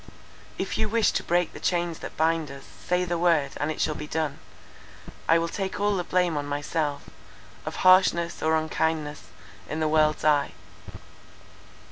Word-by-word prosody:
"If - - -3
you 215 - +1
wish 225 -1 +3
to - - -2
break 175 0 +1
the - - -9
chains 175 -2 -1
that - - -8
bind 160 -1 +1
us, 140 0 -10 0.2
say 180 0 +1
the 175 -1 -2
word, 165 -5 +2
and 145 - -1
it 155 - -4
shall 155 - +1
be 150 0 -7
done—I 160 +1 -4
will 165 0 0
take 190 +2 -4
all 205 0 +2
the 180 - -1
blame 180 -3 +1
on 145 0 -3
myself, 145 0 -2 0.6
of - - -4
harshness 185 -2 +4
or 160 0 +2
unkindness, 155 -1 -2 0.4
in 155 - -3
the 155 - +1
world's 155 0 +2
eye. 150 -2 +3
160 Hz, 165 wpm, -26 LUFS, 150-175 Hz, 0.6 s, harshness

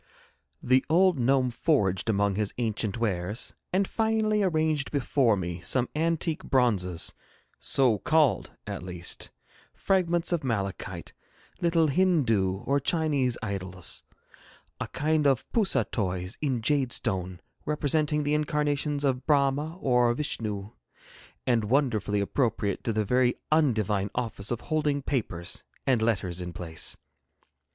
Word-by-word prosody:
The 130 +1 +4
old 180 -1 +4
gnome 130 +1 +2
foraged 115 - +1
among 100 -1 +2
his 105 +1 -2
ancient 110 -3 -1
wares, 105 -1 -2 0.2
and 190 +1 +2
finally 220 -1 +1
arranged 155 -5 +1
before 130 -5 +2
me 85 -1 -4
some 125 +8 +2
antique 165 0 0
bronzes, 95 -10 +1 0.5
so 125 -6 +3
called 150 - +2 0.2
at - - -5
least; 90 -1 -3 0.5
fragments 175 -3 +1
of 170 -4 0
malachite, 100 -7 -3 0.5
little 170 -2 +3
Hindoo 120 - +2
or 140 +1 +2
Chinese 140 -5 +1
idols, 95 -3 -4 0.8
a - - -3
kind 150 0 +1
of 135 -3 +1
poussah 190 - +2
toys 95 -1 -2
in 130 -6 -1
jade 135 -2 +1
stone, 95 -8 -2 0.3
representing 150 0 +1
the 145 +1 0
incarnations 150 -1 0
of 130 -2 0
Brahma 145 +2 +2
or 125 -4 +3
Vishnoo, 105 -7 -3 0.7
and 120 -4 +2
wonderfully 110 -5 +1
appropriate 105 -2 -1
to 115 - +1
the 110 -1 0
very 125 +3 +2 0.2
undivine 110 -10 +2
office 110 -5 -3
of 120 -1 -2
holding 150 -3 0
papers 95 -12 -3 0.2
and 125 -4 +2
letters 95 -6 0
in 90 -1 -6
place. 80 -3 -2
125 Hz, 125 wpm, -27 LUFS, 100-150 Hz, 0.8 s, The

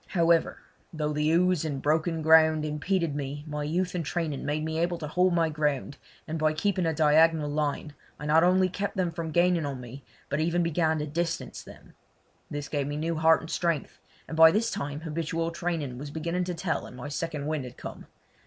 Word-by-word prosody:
However, 165 -1 +3 0.3
though 150 -2 -2
the 150 +1 +1
ooze 175 0 +3
and 145 -4 -3
broken 160 +3 0
ground 160 -1 +5
impeded 160 +2 -1
me 145 0 -4
my 150 -1 -4
youth 180 +5 -1
and 175 -2 -2
training 160 -2 -3
made 155 +1 -1
me 160 0 -2
able 175 +1 0
to 155 - -5
hold 180 +4 +2
my 165 -1 +3
ground, 150 -2 -1 0.3
and 160 0 -3
by 155 0 +2
keeping 185 +2 0
a - - +2
diagonal 155 0 +4
line 150 0 -2 0.2
I 150 - -7
not 155 +2 +4
only 185 +1 +4
kept 200 +2 -4
them 180 -2 +1
from 165 0 -4
gaining 175 +1 +2
on 140 -3 -4
me 125 +3 -10 0.2
but 140 - -2
even 170 +2 +1
began 160 -1 +1
to 150 - -2
distance 165 +3 -3
them. - - -15 0.6
This 145 -1 -5
gave 145 -2 -2
me 145 0 -3
new 165 +2 -1
heart 160 0 +4
and 160 - -8
strength, 170 -5 -2 0.3
and 160 - -6
by 160 0 +9
this 220 +6 +1
time 145 +1 -4
habitual 165 +1 -2
training 165 -7 -3
was 145 +1 -6
beginning 170 +4 -2
to 180 -1 -3
tell 165 0 -2
and 125 - -12
my 125 - -6
second 150 -1 -4
wind 155 -2 -2
had 125 0 -10
come. - - -9
160 Hz, 210 wpm, -27 LUFS, 150-170 Hz, 0.6 s, by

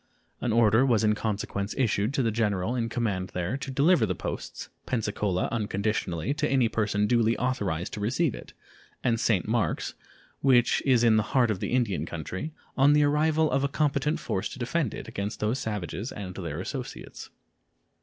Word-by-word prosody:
An 120 - -1
order 110 +1 +5
was 120 -5 +3
in 105 0 +4
consequence 105 -2 -3
issued 110 -3 +1
to 135 - +2
the 115 - +1
general 105 0 0
in 115 -2 -1
command 105 -6 -1
there 90 +6 -1
to 140 - -6
deliver 140 +2 +4
the 95 - -1
posts - - -5 0.2
Pensacola 105 -5 -1
unconditionally 105 - -1
to 150 0 -1
any 130 -3 +3
person 105 -2 0
duly 115 0 +2
authorized 100 -10 -1
to - - -4
receive 125 +7 +1
it, - - -10 0.5
and 115 -2 +2
St. 105 -6 +1
Marks, 115 0 0 0.5
which 125 -3 +4
is 125 -3 +4
in 115 -2 +5
the - - +4 0.2
heart 120 -3 +4
of 100 - -2
the - - -3
Indian 120 -7 0
country, 90 - -5 0.2
on 140 +2 +5
the 150 0 +5
arrival 155 +2 +2
of 135 +1 +1
a - - +3
competent 145 +1 0
force 95 - -2
to - - -9
defend 130 +1 -1
it - - -7
against 100 +1 -4
those 110 +5 0
savages 105 0 -4
and 95 -3 -6
their 85 -4 -5
associates. 125 +6 -6
115 Hz, 180 wpm, -27 LUFS, 100-130 Hz, 0.5 s, order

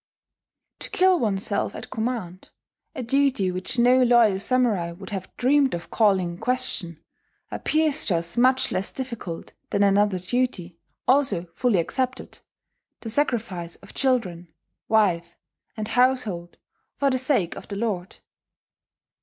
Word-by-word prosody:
To - - -5
kill 370 -1 +3
oneself 200 -3 -1
at - - -9
command 220 -6 -4 0.5
a 255 - -4
duty 260 -6 +1
which 185 +6 -2
no 250 +2 +5
loyal 235 -5 +4
samurai 220 -7 +1
would 190 +3 -11
have 190 -2 -5
dreamed 270 -2 +3
of 170 - -8
calling 195 -5 +2
in 170 - -9
question 225 -9 -2 0.5
appears 310 -1 0
to 185 - +1
us 170 +1 -1
much 255 +2 +3
less 185 +2 -1
difficult 235 -10 -6 0.2
than 200 - +1
another 200 -1 +3
duty, 185 -4 -2 0.3
also 265 -9 +3
fully 245 -6 +1
accepted: 255 +9 -3 0.6
the 225 - -4
sacrifice 215 - -1
of 195 - -16
children, 195 -11 0 0.4
wife, 175 -6 +1 0.4
and 215 -1 -4
household 225 -9 +1 0.4
for 280 -1 +1
the 260 - +1
sake 250 - +1
of - - -10
the 200 - -6
lord. 200 -4 -3
220 Hz, 135 wpm, -24 LUFS, 185-255 Hz, 0.6 s, no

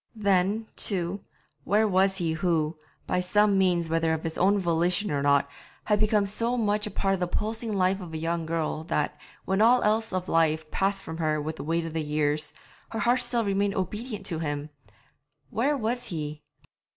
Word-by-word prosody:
Then, 200 +1 +1
too, 185 -1 -1 0.4
where 215 +2 +3
was 190 0 +2
he 165 -3 0
who, 160 -1 0 0.3
by 180 - 0
some 205 +2 +3
means, 175 -3 +2
whether 165 0 +1
of 160 - -6
his 160 -1 -3
own 195 +3 +3
volition 180 +2 +1
or 145 -1 0
not, 140 0 +3 0.4
had 210 -1 +1
become 215 -1 +3
so 230 +5 -1
much 210 -2 +1
a - - -4
part 195 -1 0
of 190 - -1
the 180 - 0
pulsing 220 +4 -3
life 190 0 +1
of 175 -3 -8
a 160 - -4
young 165 0 -2
girl 160 -1 -2
that, 150 -2 -1 0.3
when 190 +2 +1
all 240 +3 +5
else 220 +1 +1
of 185 -1 -2
life 155 -1 +1
passed 195 0 0
from 160 0 -6
her 155 -2 0
with 155 +2 -4
the - - -6
weight 165 +2 0
of 165 -1 -6
years, 150 -1 0 0.4
her 225 - -5
heart 245 +2 +2
still 240 -2 +1
remained 200 0 +1
obedient 210 +2 -4
to 165 -5 +1
him? 145 -1 -3 0.8
Where 280 +7 +1
was 245 +1 -2
he? 150 -4 -5
185 Hz, 190 wpm, -27 LUFS, 160-210 Hz, 0.8 s, all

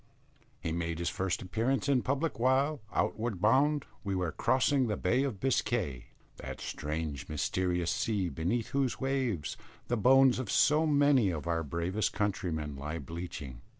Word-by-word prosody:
He 80 - -3
made 85 0 -2
his 85 0 -1
first 95 -1 -2
appearance 115 +9 0
in 135 -3 +3
public 140 +1 -1
while, 135 +4 +2
outward 110 -4 -1
bound, 140 +7 +3 0.2
we 100 -1 -2
were 90 -3 -1
crossing 130 - +2
the 105 -2 -1
Bay 120 +8 +2
of 130 -8 -2
Biscay 100 - 0 0.3
that - - -7
strange 75 -2 -4
mysterious 90 +3 0
sea, 110 -4 0
beneath 85 - -2
whose 135 -3 0
waves 130 - -1 0.3
the 120 - +1
bones 130 +3 +5
of 125 -6 -4
so 155 +2 +4
many 145 -7 +4
of 80 -3 -4
our 85 -1 0
bravest 85 +7 -1
countrymen 85 -8 -2
lie 75 +4 -4
bleaching. 80 -7 -7
105 Hz, 150 wpm, -31 LUFS, 85-130 Hz, 0.3 s, bones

